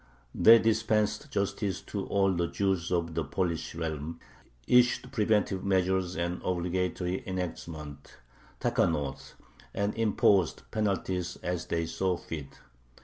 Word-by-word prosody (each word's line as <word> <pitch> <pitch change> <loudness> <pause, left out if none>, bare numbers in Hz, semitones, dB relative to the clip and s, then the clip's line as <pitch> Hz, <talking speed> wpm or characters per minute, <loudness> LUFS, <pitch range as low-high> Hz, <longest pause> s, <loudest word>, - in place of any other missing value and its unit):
They 115 +1 +8
dispensed 110 +2 +1
justice 100 -3 -1
to 100 -2 -5
all 95 -1 +2
the 85 -1 0
Jews 95 -2 -1
of 85 -2 0
the 80 0 -1
Polish 80 +2 -2
realm, 80 0 -4 0.5
issued 125 +1 +3
preventive 105 -5 +1
measures 95 -2 +1
and 85 +1 -2
obligatory 90 +1 -1
enactments 80 -6 -6 0.5
(takkanoth), 70 -2 -1 0.4
and 100 +1 0
imposed 105 -5 +2
penalties 95 -4 -1
as 90 -1 -2
they 85 0 0
saw 90 +2 -1
fit. 75 -5 -8
90 Hz, 115 wpm, -29 LUFS, 85-100 Hz, 0.5 s, They